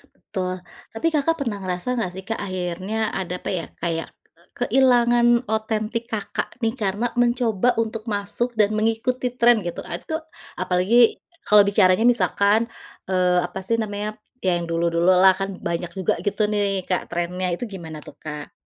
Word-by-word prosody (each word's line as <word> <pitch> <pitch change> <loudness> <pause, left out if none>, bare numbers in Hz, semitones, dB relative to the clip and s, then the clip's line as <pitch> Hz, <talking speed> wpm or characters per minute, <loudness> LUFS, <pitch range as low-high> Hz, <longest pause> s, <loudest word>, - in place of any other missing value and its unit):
Betul. 185 -1 -4 0.3
Tapi 225 +9 -1
Kakak, 310 +2 +2
pernah 215 -5 -3
ngerasa 185 +7 -2
enggak 190 -7 -1
sih, 190 - -7
Kak, 225 - -2
akhirnya 185 +3 -2
ada 180 -1 -3
apa - - -5
ya? 175 -3 -2
Kayak, 165 -1 -2 0.3
eee, - - -27
kehilangan 240 -2 +4 0.2
otentik, 220 +1 -1
Kakak 210 -2 -3
nih, 225 0 +2
karena 210 +1 -1
mencoba 240 -2 +2
untuk 225 -1 -2
masuk 205 +4 -1
dan 210 0 +4
mengikuti 225 +3 0
tren 235 -4 +4
gitu. 175 - -4
Ad 170 0 -5
tuh, 315 0 -2 0.4
apalagi 205 +7 +3 0.3
kalau 210 -1 +7
bicaranya 200 +1 +4
misalkan, 215 0 +3 0.4
eee, 180 -1 +2
apa 190 - -7
sih 230 - +1
namanya, 210 0 -3 0.3
ya 180 -2 +2
yang 170 - -3
dulu-dulu 170 +1 +2
lah, 190 +1 +7
kan 195 0 -2
banyak 170 0 -3
juga 190 -2 +1
gitu 205 +2 -2
nih, 200 -3 0
Kak, 185 - 0
trennya 180 +2 -2
itu 245 - -7
gimana 165 -6 -8
tuh, - - -13
Kak? 150 -1 -7
200 Hz, 165 wpm, -23 LUFS, 180-225 Hz, 0.4 s, kalau